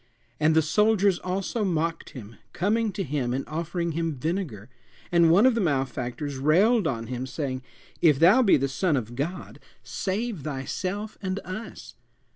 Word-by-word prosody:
And 155 +1 +3
the 160 - +5
soldiers 205 +2 +3
also 195 +4 -2
mocked 165 -3 -1
him, 115 -4 -11 0.2
coming 215 +4 +1
to 195 - -2
him 135 -5 -2
and 135 - -4
offering 170 +2 -3
him 165 -1 -2
vinegar; 150 - -3 0.4
and 170 -1 +5
one 190 +8 +6
of 260 - +5
the 230 - 0
malefactors 135 -2 -2
railed 185 - +3
on 115 -5 -2
him, 125 +2 -4
saying, 130 -2 -4 0.4
If 155 -5 +5
thou 185 - +6
be 210 -6 +5
the 140 0 0
Son 150 +3 0
of 120 -1 -5
God, 165 +8 -5 0.2
save 205 -1 -3
thyself 185 +9 -4
and 190 -1 -2
us. 210 +5 -8
165 Hz, 160 wpm, -26 LUFS, 135-195 Hz, 0.4 s, one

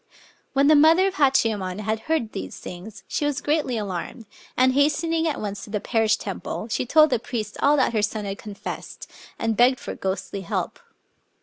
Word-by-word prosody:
When 275 +1 +3
the 305 +2 +6
mother 320 +5 +6
of 390 -1 -2
Hachiyemon 215 -9 +1
had 215 +1 -1
heard 275 -9 0
these 95 0 -6
things, 195 +4 -9
she - - -2
was 290 -1 0
greatly 295 -5 0
alarmed; 205 +3 -5 0.3
and, 255 0 +4
hast 290 +3 +2
ening 330 0 0
at 310 - -2
once 205 -1 -5
to - - -14
the 210 0 -2
parish 220 0 +1
temple, 205 +2 -5
she 225 - -1
told 310 +2 +5
the 245 - +2
priest 220 -3 -5
all 290 +1 +4
that 260 - +2
her 215 - +2
son 210 0 -2
had 195 0 -5
confessed, 205 -2 -7 0.3
and 225 -1 -1
begged 245 +3 +4
for - - -6
ghostly 195 +1 -4
help. 175 - -3
230 Hz, 195 wpm, -24 LUFS, 210-290 Hz, 0.3 s, the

